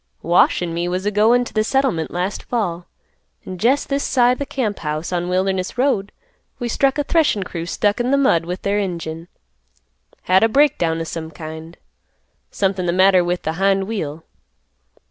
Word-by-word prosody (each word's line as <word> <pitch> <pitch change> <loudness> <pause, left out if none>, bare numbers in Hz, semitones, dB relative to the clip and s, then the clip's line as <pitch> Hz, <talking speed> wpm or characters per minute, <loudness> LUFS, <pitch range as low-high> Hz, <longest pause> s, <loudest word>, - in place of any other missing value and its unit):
"Wash 175 +1 +3
an' 170 -1 -3
me 170 +1 -2
was 185 +2 -2
a 210 - +1
goin' 225 +4 +3
to - - -10
th' 215 - +2
settlement 255 -10 0
last 180 +3 -3
fall, 180 -8 -3 0.6
an' 185 -1 -7
jest 260 +8 +2
this 280 0 -1
side 250 -1 +2
th' 280 - -4
camp 220 -7 -2
house, 155 +3 -4
on 175 0 -1
Wilderness 185 +2 -1
Road, 245 -7 +1 0.5
we 245 - -3
struck 270 +4 +1
a 290 - +1
threshin' 290 - +1
crew 170 -2 -6
stuck 205 +5 0
in 245 +2 0
th' 280 - +4
mud 170 -12 +2
with 180 +2 -5
their 200 +1 +1
engine. 170 -4 -4 1.0
Had 185 +1 +4
a 225 - +4
break 290 +4 +3
down 165 -1 0
o' - - -1
some 160 0 -6
kind. 160 +1 -9 0.7
Somethin' 190 -2 -1
th' 170 - 0
matter 185 -1 +5
with 175 +1 -2
th' 160 +1 -3
hind 195 0 +3
wheel. 165 -7 -4
190 Hz, 185 wpm, -20 LUFS, 170-235 Hz, 1.0 s, matter